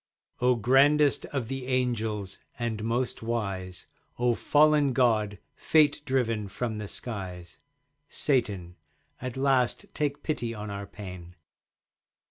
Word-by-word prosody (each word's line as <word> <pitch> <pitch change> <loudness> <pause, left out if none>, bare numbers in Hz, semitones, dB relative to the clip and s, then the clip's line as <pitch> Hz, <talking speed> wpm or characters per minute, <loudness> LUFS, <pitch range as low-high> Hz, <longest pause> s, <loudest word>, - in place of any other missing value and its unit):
O 125 0 +4
grandest 140 +6 +4
of 135 -5 -3
the 135 0 -4
Angels, 110 -6 -1 0.2
and 115 -3 -2
most 120 +3 -1
wise, 100 -6 -3 0.3
O 120 0 +2
fallen 150 +1 +4
God, 110 -5 +2 0.2
fate 155 -3 +3
driven 115 -6 0
from 110 +1 -3
the 105 - -5
skies, 95 -7 -6 0.5
Satan, 100 - -1 0.4
at 130 0 -5
last 135 - +2
take 145 -2 -2
pity 120 -7 -2
on 105 -1 -6
our 100 0 -5
pain. 90 -4 -9
120 Hz, 115 wpm, -28 LUFS, 105-130 Hz, 0.5 s, O